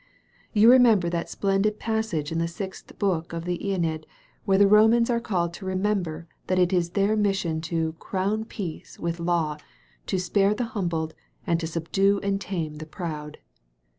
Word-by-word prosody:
You 220 Hz, +2 st, +7 dB
remember 225 Hz, -9 st, +5 dB
that 170 Hz, -1 st, -2 dB
splendid 200 Hz, +2 st, 0 dB
passage 220 Hz, -10 st, -2 dB
in 165 Hz, -, -1 dB
the 165 Hz, -, 0 dB
Sixth 190 Hz, +3 st, -8 dB
Book 170 Hz, -5 st, -1 dB
of 165 Hz, 0 st, -4 dB
the 175 Hz, -1 st, -2 dB
iEneid 165 Hz, -5 st, -1 dB, 0.4 s
where 195 Hz, -1 st, +3 dB
the 200 Hz, -, +6 dB
Romans 225 Hz, +3 st, +5 dB
are 235 Hz, -, +2 dB
called 175 Hz, -7 st, -1 dB
to 190 Hz, -, -9 dB
remember 185 Hz, -4 st, -1 dB, 0.2 s
that 185 Hz, -, +1 dB
it 180 Hz, 0 st, +3 dB
is 175 Hz, -2 st, +1 dB
their 200 Hz, +2 st, +3 dB
mission 195 Hz, -6 st, 0 dB
'to 160 Hz, -1 st, -1 dB
crown 205 Hz, +3 st, -1 dB
Peace 185 Hz, -8 st, -7 dB
with 170 Hz, 0 st, -3 dB
Law, 170 Hz, -3 st, 0 dB, 0.5 s
to -, -, 0 dB
spare 195 Hz, +3 st, +2 dB
the 245 Hz, -, -1 dB
humbled, 165 Hz, -5 st, -2 dB, 0.3 s
and 170 Hz, -1 st, +1 dB
to 165 Hz, -, -3 dB
subdue 195 Hz, +5 st, +1 dB
and 195 Hz, 0 st, 0 dB
tame 165 Hz, -6 st, -4 dB
the 155 Hz, +1 st, -8 dB
proud.' 155 Hz, -3 st, -6 dB
185 Hz, 170 wpm, -25 LUFS, 165-200 Hz, 0.5 s, You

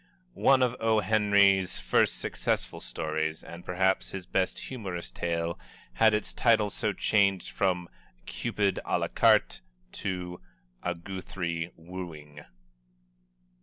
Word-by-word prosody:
One 135 Hz, -, +4 dB
of 125 Hz, -1 st, +1 dB
O. 110 Hz, -1 st, +3 dB
Henry's 100 Hz, -2 st, +3 dB
first -, -, +2 dB
successful -, -, -2 dB
stories, 80 Hz, +5 st, -3 dB
and 85 Hz, +1 st, -10 dB
perhaps 95 Hz, +1 st, +1 dB
his 95 Hz, -2 st, -6 dB
best 95 Hz, +1 st, 0 dB
humorous 95 Hz, -9 st, -6 dB
tale, 85 Hz, 0 st, -2 dB, 0.3 s
had 110 Hz, -, +5 dB
its 105 Hz, -, -3 dB
title 110 Hz, -4 st, +3 dB
so 110 Hz, -1 st, -1 dB
changed 100 Hz, -2 st, +1 dB
from 90 Hz, -3 st, 0 dB, 0.4 s
"Cupid 100 Hz, +11 st, -1 dB
Ă -, -, 0 dB
la -, -, -2 dB
carte," -, -, +3 dB, 0.3 s
to 90 Hz, -4 st, -4 dB, 0.4 s
"A 90 Hz, 0 st, -2 dB
Guthrie 85 Hz, -2 st, -4 dB
Wooing." 80 Hz, -4 st, -9 dB
95 Hz, 120 wpm, -29 LUFS, 85-100 Hz, 0.4 s, had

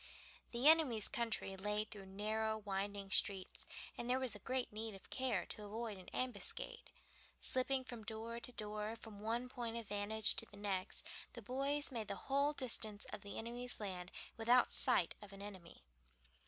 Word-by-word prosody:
The 245 Hz, +4 st, +4 dB
enemy's 295 Hz, -10 st, +7 dB
country 225 Hz, -4 st, 0 dB
lay 210 Hz, +2 st, 0 dB
through 200 Hz, -3 st, -9 dB
narrow 220 Hz, +3 st, 0 dB
winding 200 Hz, -1 st, -2 dB
streets, 190 Hz, 0 st, +1 dB, 0.3 s
and 240 Hz, -, -4 dB
there 255 Hz, -, +4 dB
was 260 Hz, -5 st, 0 dB
great 255 Hz, -3 st, 0 dB
need 220 Hz, -1 st, -3 dB
of 195 Hz, -, -14 dB
care 260 Hz, -1 st, +1 dB
to 215 Hz, -, -7 dB
avoid 215 Hz, -1 st, -3 dB
an 185 Hz, -, -10 dB
ambuscade. 250 Hz, -5 st, -2 dB, 0.5 s
Slipping 260 Hz, +1 st, +2 dB
from 240 Hz, -3 st, -6 dB
door 225 Hz, +2 st, -3 dB
to 250 Hz, -, -1 dB
door, 215 Hz, -1 st, -3 dB
from 220 Hz, -3 st, -9 dB
one 230 Hz, +4 st, 0 dB
point 235 Hz, -2 st, -3 dB
of 230 Hz, -2 st, -5 dB
vantage 205 Hz, +1 st, +4 dB
to 225 Hz, -, -1 dB
the 200 Hz, -, -13 dB
next, 200 Hz, -2 st, -1 dB, 0.3 s
the 235 Hz, -, -8 dB
boys 275 Hz, +5 st, +1 dB
made 225 Hz, -4 st, -2 dB
the -, -, -2 dB
whole 280 Hz, +2 st, +2 dB
distance 220 Hz, -6 st, 0 dB
of -, -, -4 dB
the 200 Hz, -, -6 dB
enemy's 240 Hz, +2 st, -2 dB
land 185 Hz, -3 st, -4 dB, 0.3 s
without 240 Hz, +2 st, +5 dB
sight 245 Hz, -10 st, +4 dB
of 205 Hz, -1 st, -10 dB
an 195 Hz, -, -9 dB
enemy. 185 Hz, -, -9 dB
220 Hz, 170 wpm, -40 LUFS, 205-245 Hz, 0.5 s, enemy's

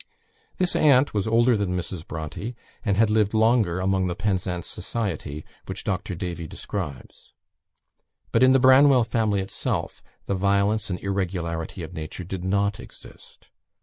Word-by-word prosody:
This 180 Hz, -1 st, 0 dB
aunt 140 Hz, -2 st, +4 dB
was 105 Hz, 0 st, 0 dB
older 120 Hz, +2 st, +4 dB
than 95 Hz, -4 st, -1 dB
Mrs. 85 Hz, -1 st, -6 dB
Bronte, 80 Hz, +10 st, -5 dB, 0.3 s
and 100 Hz, -5 st, +1 dB
had 110 Hz, 0 st, +4 dB
lived 105 Hz, 0 st, +2 dB
longer 110 Hz, -5 st, +3 dB
among 95 Hz, 0 st, +1 dB
the 85 Hz, -, -2 dB
Penzance 95 Hz, -3 st, -2 dB
society, 80 Hz, -9 st, -4 dB, 0.2 s
which 95 Hz, +1 st, -5 dB
Dr. 95 Hz, -2 st, -2 dB
Davy 85 Hz, -2 st, -5 dB
describes. 75 Hz, -8 st, -7 dB, 1.0 s
But 115 Hz, -, +2 dB
in 130 Hz, 0 st, +7 dB
the 135 Hz, -, +5 dB
Branwell 130 Hz, 0 st, +6 dB
family 110 Hz, -3 st, 0 dB
itself, 95 Hz, -, -3 dB, 0.2 s
the -, -, -1 dB
violence 100 Hz, +2 st, +1 dB
and 90 Hz, -, -3 dB
irregularity 90 Hz, -2 st, -3 dB
of 80 Hz, -, -8 dB
nature 80 Hz, +3 st, -6 dB
did 90 Hz, 0 st, -6 dB
not 100 Hz, +1 st, 0 dB
exist. -, -, -15 dB
100 Hz, 150 wpm, -25 LUFS, 90-110 Hz, 1.0 s, in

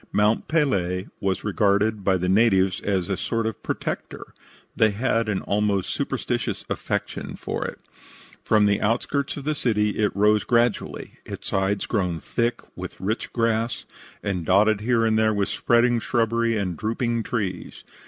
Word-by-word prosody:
Mont 105 Hz, +2 st, +2 dB
Pelee 95 Hz, -, 0 dB
was 95 Hz, -1 st, -1 dB
regarded 105 Hz, 0 st, +1 dB
by 95 Hz, -1 st, +3 dB
the 90 Hz, 0 st, -2 dB
natives 95 Hz, -2 st, +3 dB
as 95 Hz, -3 st, 0 dB
a 100 Hz, -, 0 dB
sort 115 Hz, +4 st, -2 dB
of 110 Hz, -3 st, -3 dB
protector; -, -, -5 dB, 0.4 s
they 110 Hz, -, +4 dB
had 115 Hz, +1 st, 0 dB
an 100 Hz, -3 st, -1 dB
almost 100 Hz, -2 st, 0 dB
superstitious -, -, -2 dB
affection -, -, -3 dB
for -, -, -3 dB
it. -, -, -7 dB, 0.7 s
From 105 Hz, -1 st, +4 dB
the 100 Hz, -1 st, +2 dB
outskirts 125 Hz, +7 st, 0 dB
of 140 Hz, -, -6 dB
the 155 Hz, +2 st, 0 dB
city 105 Hz, -7 st, 0 dB
it 105 Hz, -1 st, +2 dB
rose 105 Hz, +1 st, +3 dB
gradually, 120 Hz, -2 st, 0 dB
its -, -, -8 dB
sides 95 Hz, +1 st, 0 dB
grown 90 Hz, -7 st, -1 dB
thick 120 Hz, +7 st, -1 dB
with -, -, -7 dB
rich 105 Hz, +4 st, -2 dB
grass, 115 Hz, 0 st, 0 dB, 0.4 s
and 95 Hz, -4 st, -2 dB
dotted 100 Hz, +4 st, +3 dB
here 115 Hz, 0 st, +2 dB
and 110 Hz, -1 st, +2 dB
there 110 Hz, -1 st, +3 dB
with 100 Hz, -1 st, 0 dB
spreading 120 Hz, 0 st, +3 dB
shrubbery 115 Hz, 0 st, +1 dB
and 90 Hz, -5 st, -2 dB
drooping 115 Hz, +1 st, -1 dB
trees. 100 Hz, -6 st, -4 dB
105 Hz, 155 wpm, -24 LUFS, 100-115 Hz, 0.7 s, they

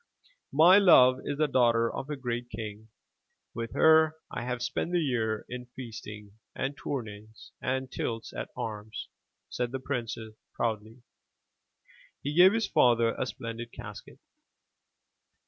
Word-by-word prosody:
*' -, -, -40 dB
My 175 Hz, +7 st, +7 dB
love 130 Hz, -10 st, +7 dB
is 145 Hz, -, -3 dB
the 155 Hz, 0 st, +2 dB
daughter 115 Hz, -4 st, +3 dB
of 135 Hz, -, -5 dB
a 150 Hz, -, -2 dB
great 120 Hz, -2 st, -4 dB
king. 110 Hz, -1 st, -7 dB, 0.7 s
With 115 Hz, 0 st, -5 dB
her 160 Hz, 0 st, +5 dB, 0.2 s
I -, -, -4 dB
have 125 Hz, -1 st, -3 dB
spent 145 Hz, +8 st, -2 dB
the 175 Hz, -, +3 dB
year 115 Hz, -8 st, -1 dB
in 125 Hz, 0 st, -7 dB
feasting 105 Hz, -4 st, -9 dB, 0.2 s
and 135 Hz, +2 st, -2 dB
tourneys 110 Hz, -6 st, -7 dB
and 130 Hz, 0 st, -2 dB
tilts 115 Hz, -1 st, -4 dB
at -, -, -5 dB
arms,*' 110 Hz, 0 st, -5 dB, 0.4 s
said 125 Hz, -1 st, -3 dB
the 135 Hz, -, -3 dB
prince 125 Hz, -3 st, -3 dB, 0.4 s
proudly, 110 Hz, -2 st, -1 dB
and 120 Hz, +1 st, -23 dB, 1.2 s
he 145 Hz, -, -2 dB
gave 180 Hz, +4 st, +7 dB
his 225 Hz, 0 st, +1 dB
father 115 Hz, -2 st, +3 dB
a 130 Hz, -, -3 dB
splendid 115 Hz, -1 st, -6 dB
casket. -, -, -10 dB
120 Hz, 145 wpm, -29 LUFS, 115-140 Hz, 1.2 s, My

